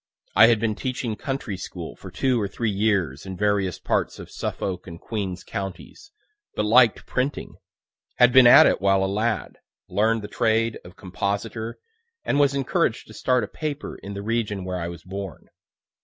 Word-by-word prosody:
I 110 - +8
had 115 -2 +4
been 110 0 0
teaching 125 -1 -3
country 135 -7 -4
school 90 -2 -7
for 95 - -11
two 120 +6 0
or 100 - -1
three 110 +3 -2
years 95 -9 0
in 95 -1 -7
various 100 -3 +1
parts - - -1
of - - -10
Suffolk 90 -2 -4
and 85 -1 -9
Queens 100 -5 -4
counties, 100 - -7 0.5
but 105 - 0
liked 120 +1 +5
printing; 130 +3 -3 0.6
had 125 0 +5
been 130 -2 +8
at - - +9
it - - +2
while 95 -1 +3
a - - +2
lad, 105 +4 -2 0.3
learn'd 110 +3 +1
the - - -5
trade 115 0 +1
of 90 +1 -13
compositor, 100 +4 -4 0.5
and 145 - +1
was 140 -1 +3
encouraged 135 -2 0
to - - -11
start 125 -1 +1
a - - -3
paper 150 -2 -5
in 100 0 -8
the 100 - -5
region 105 -4 -2
where 90 -1 -3
I 85 - -3
was 85 -1 -8
born. 95 -2 -7
105 Hz, 180 wpm, -24 LUFS, 95-120 Hz, 0.6 s, at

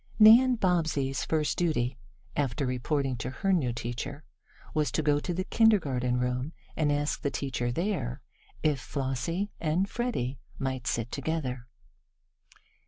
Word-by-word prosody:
Nan 235 +4 +8
Bobbsey's 160 - +1
first 155 -2 0
duty, 130 -8 +1 0.4
after 140 0 0
reporting 130 +1 0
to 120 +2 -3
her 195 +9 0
new 140 -9 +2
teacher, 120 +5 -5 0.5
was 150 -5 +1
to 155 - +1
go 145 0 +3
to 175 - -3
the 180 +2 -1
kindergarten 145 - +3
room, 125 +4 -1 0.2
and 150 -2 +2
ask 145 +1 0
the 140 - 0
teacher 125 -4 -2
there 140 - -2 0.4
if 150 -3 +2
Flossie 145 - -2
and 170 +5 +1
Freddie 200 - -2 0.2
might 130 -2 -3
sit 115 0 -1
together. 135 -5 -3
145 Hz, 135 wpm, -29 LUFS, 125-170 Hz, 0.5 s, Nan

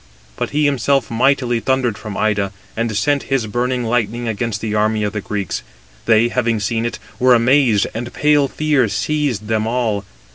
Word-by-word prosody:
But - - -3
he 150 +1 +1
himself 140 -2 +1
mightily 125 0 +2
thundered 130 -2 0
from 105 -1 -7
Ida, 100 -2 0 0.2
and 115 -2 -1
sent 140 +7 +1
his 135 -4 +1
burning 125 +3 -1
lightning 120 0 -1
against 110 -1 -2
the 110 -1 -3
army 110 0 +1
of 105 - -2
the 105 - -3
Greeks: 100 -3 -3 0.4
they 115 +1 +4
having 115 -3 0
seen 115 +2 -1
it, - - -5 0.2
were 125 0 +5
amazed, 120 -3 +3
and 120 +2 -5
pale 145 -1 +3
fear 150 -4 +1
seized 145 -6 -1
them 110 0 0
all. 115 -4 -1
115 Hz, 175 wpm, -18 LUFS, 110-130 Hz, 0.4 s, were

